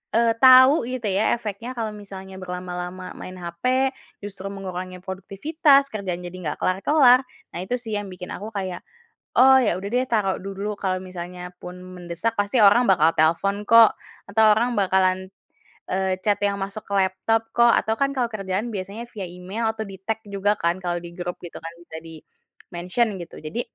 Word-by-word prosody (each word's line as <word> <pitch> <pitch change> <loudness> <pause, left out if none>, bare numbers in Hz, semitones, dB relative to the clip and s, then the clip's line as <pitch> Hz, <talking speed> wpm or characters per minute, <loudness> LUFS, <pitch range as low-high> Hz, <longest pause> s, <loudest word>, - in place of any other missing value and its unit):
eee, 230 0 +4
tau 260 +3 +8
gitu 250 -3 -3
ya 200 +5 +2
efeknya 225 +2 -6
kalau 225 -2 -3
misalnya 190 -2 -10
berlama-lama 180 0 -6
main 185 - -8
hape 250 +11 0 0.3
justru 195 -1 -7
mengurangi 185 -2 -6
produktivitas, 275 - +2
kerjaan 190 -5 -4
jadi 175 - -7
nggak 150 -2 -3
kelar-kelar, 250 +7 +5 0.3
nah - - -6
itu 215 +6 -2
sih 225 -3 -4
yang 205 - -6
bikin 180 0 -8
aku 205 - -7
kayak, 190 -4 -4 0.6
oh, 265 +1 +8
ya 235 - +2
udah 195 +2 -5
deh 250 +1 +2
taruh 210 -5 +1
dulu. 195 +2 -5
Kalau 185 -2 0
misalnya 180 -1 -7
pun 180 0 -8
mendesak 180 +3 -4
pasti 205 +4 +1
orang 205 +5 +6
bakal 165 -4 +4
telepon 195 +6 +1
kok 230 -1 +7 0.4
atau 220 +1 +4
orang 240 +3 +1
bakalan, 190 -1 +1 0.6
eee, 190 0 0
chat 205 -1 +3
yang 200 0 +1
masuk 195 +2 -5
ke - - -7
laptop 195 +4 +1
kok 235 0 +5
atau 220 - +2
kan 275 0 +2
kalau 245 -2 +1
kerjaan 195 +1 -3
biasanya 200 +3 -5
via 200 -3 -5
email 180 +6 -5
atau 220 0 -5
di-tag 195 +3 -4
juga 200 +1 0
kan 170 +1 +1
kalau 175 -1 -2
di - - -6
grup 175 0 -4
gitu 175 - -9
kan 165 0 -7
bisa 160 - -10
dimention 175 +5 -4
gitu. 170 - -9
Jadi, 155 +9 -4
195 Hz, 175 wpm, -23 LUFS, 180-225 Hz, 0.6 s, tau